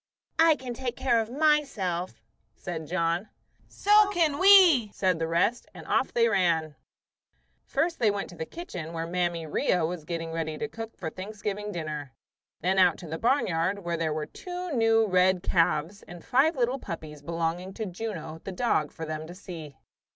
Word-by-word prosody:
"I 325 Hz, -1 st, +6 dB
can 255 Hz, -3 st, -6 dB
take 245 Hz, 0 st, -4 dB
care 235 Hz, -3 st, +2 dB
of 220 Hz, -, -5 dB
myself," 250 Hz, -, 0 dB, 0.3 s
said 160 Hz, -4 st, -6 dB
John. 170 Hz, +3 st, -1 dB, 0.4 s
"So 415 Hz, 0 st, +4 dB
can 325 Hz, -7 st, +1 dB
we," 370 Hz, -, +7 dB
said 185 Hz, -4 st, +1 dB
the 165 Hz, -, -1 dB
rest; 175 Hz, +9 st, +1 dB
and -, -, -10 dB
off -, -, +1 dB
they 230 Hz, -1 st, +3 dB
ran. 170 Hz, -7 st, +1 dB, 0.9 s
First 335 Hz, +1 st, 0 dB
they 225 Hz, -4 st, +4 dB
went 200 Hz, -1 st, -2 dB
to -, -, -11 dB
the 160 Hz, -1 st, -5 dB
kitchen 180 Hz, -, -7 dB
where 165 Hz, 0 st, -3 dB
Mammy 170 Hz, -1 st, -1 dB
'Ria 160 Hz, +2 st, +1 dB
was 170 Hz, -1 st, -4 dB
getting 165 Hz, 0 st, -4 dB
ready 160 Hz, -1 st, -3 dB
to 225 Hz, -, -3 dB
cook 225 Hz, 0 st, -8 dB
the 160 Hz, -3 st, -5 dB
Thanksgiving 210 Hz, +1 st, -5 dB
dinner; 155 Hz, -, -5 dB, 0.5 s
then 190 Hz, +2 st, +2 dB
out 180 Hz, -3 st, +5 dB
to 175 Hz, -, -10 dB
the 160 Hz, +1 st, -5 dB
barnyard, 200 Hz, -, +1 dB
where 170 Hz, 0 st, -1 dB
there 165 Hz, -1 st, -1 dB
were 155 Hz, 0 st, -2 dB
two 360 Hz, -1 st, -7 dB
new 225 Hz, -3 st, +3 dB
red 185 Hz, -2 st, +3 dB
calves, 165 Hz, +3 st, +1 dB
and 175 Hz, -1 st, -11 dB
five 290 Hz, +6 st, +3 dB
little 255 Hz, +1 st, 0 dB
puppies 155 Hz, -, -7 dB
belonging 170 Hz, +4 st, -2 dB
to 220 Hz, -, -3 dB
Juno, 180 Hz, -5 st, -6 dB
the 195 Hz, -, -5 dB
dog, 180 Hz, -7 st, 0 dB
for 160 Hz, -, -7 dB
them 155 Hz, 0 st, -5 dB
to 175 Hz, -, -10 dB
see. 165 Hz, -7 st, -9 dB
185 Hz, 180 wpm, -27 LUFS, 165-235 Hz, 0.9 s, we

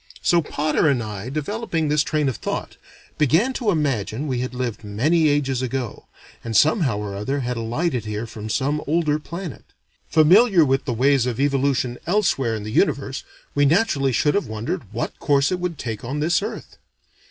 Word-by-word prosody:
So 170 Hz, -1 st, +4 dB
Potter 155 Hz, +1 st, 0 dB
and 125 Hz, -4 st, +1 dB
I, 105 Hz, +1 st, -6 dB
developing 165 Hz, -, -2 dB
this 150 Hz, 0 st, +3 dB
train 150 Hz, -1 st, 0 dB
of 130 Hz, -, -1 dB
thought, -, -, -4 dB, 0.4 s
began 165 Hz, -, +3 dB
to 240 Hz, -4 st, -1 dB
imagine 140 Hz, -, -1 dB
we 130 Hz, -4 st, -1 dB
had 125 Hz, 0 st, -4 dB
lived 125 Hz, -3 st, -3 dB
many 150 Hz, +11 st, +2 dB
ages 135 Hz, -3 st, 0 dB
ago, 130 Hz, -2 st, -4 dB, 0.4 s
and 115 Hz, -2 st, 0 dB
somehow 150 Hz, -, +3 dB
or 105 Hz, -1 st, -4 dB
other 135 Hz, +8 st, -2 dB
had 125 Hz, 0 st, -2 dB
alighted 120 Hz, +3 st, -2 dB
here 105 Hz, +1 st, -3 dB
from 110 Hz, -1 st, -8 dB
some 140 Hz, +7 st, 0 dB
older 155 Hz, -1 st, +1 dB
planet. 170 Hz, 0 st, -7 dB, 0.5 s
Familiar 175 Hz, +3 st, +6 dB
with 135 Hz, 0 st, +1 dB
the 135 Hz, -, -1 dB
ways 130 Hz, +1 st, +3 dB
of 120 Hz, -1 st, -3 dB
evolution 135 Hz, -3 st, +1 dB
elsewhere 170 Hz, -, +1 dB
in 105 Hz, -, -5 dB
the 105 Hz, -, -6 dB
universe, 135 Hz, -, 0 dB, 0.3 s
we 145 Hz, -, +2 dB
naturally 140 Hz, -3 st, +2 dB
should 145 Hz, +4 st, +2 dB
have 200 Hz, -, 0 dB
wondered 110 Hz, -1 st, -4 dB
what 115 Hz, +2 st, -4 dB
course 140 Hz, +1 st, +2 dB
it 180 Hz, -, -1 dB
would 175 Hz, -3 st, -3 dB
take 115 Hz, -6 st, -5 dB
on 135 Hz, +5 st, -3 dB
this 170 Hz, +5 st, +2 dB
earth. 210 Hz, -, -7 dB
140 Hz, 180 wpm, -22 LUFS, 120-155 Hz, 0.5 s, Familiar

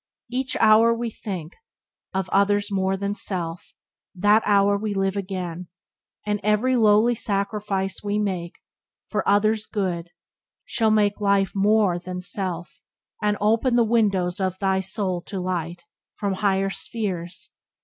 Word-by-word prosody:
"Each 255 Hz, +1 st, -1 dB
hour 220 Hz, +1 st, +6 dB
we 230 Hz, 0 st, -3 dB
think 185 Hz, -7 st, -6 dB, 0.6 s
Of 190 Hz, -2 st, -2 dB
others 205 Hz, +1 st, +2 dB
more 190 Hz, 0 st, 0 dB
than 200 Hz, +1 st, -2 dB
self, 175 Hz, -5 st, -5 dB, 0.4 s
that 205 Hz, +4 st, +4 dB
hour 200 Hz, -1 st, +4 dB
we 205 Hz, 0 st, -2 dB
live 195 Hz, 0 st, 0 dB
again, 180 Hz, -3 st, -4 dB, 0.6 s
And 210 Hz, 0 st, 0 dB
every 215 Hz, +5 st, +2 dB
lowly 220 Hz, +1 st, +4 dB
sacrifice 200 Hz, -2 st, -2 dB
we 205 Hz, 0 st, -1 dB
make 185 Hz, -5 st, -2 dB, 0.5 s
For 210 Hz, -, 0 dB
other's 215 Hz, +1 st, +2 dB
good 180 Hz, -5 st, -2 dB, 0.6 s
shall 225 Hz, -2 st, +1 dB
make 210 Hz, -1 st, +2 dB
life 200 Hz, -1 st, +2 dB
more 200 Hz, -2 st, +3 dB
than 180 Hz, +1 st, -6 dB
self, 180 Hz, -2 st, -5 dB, 0.4 s
And 210 Hz, 0 st, +1 dB
ope 215 Hz, +2 st, +3 dB
the 240 Hz, -1 st, +4 dB
windows 200 Hz, -5 st, +1 dB
of 185 Hz, -1 st, -1 dB
thy 190 Hz, -1 st, +1 dB
soul 190 Hz, -2 st, -2 dB
to 195 Hz, -, -4 dB
light 175 Hz, -1 st, -3 dB, 0.3 s
From 200 Hz, -2 st, -1 dB
higher 195 Hz, 0 st, +1 dB
spheres. 195 Hz, -1 st, -4 dB
200 Hz, 140 wpm, -24 LUFS, 185-210 Hz, 0.6 s, hour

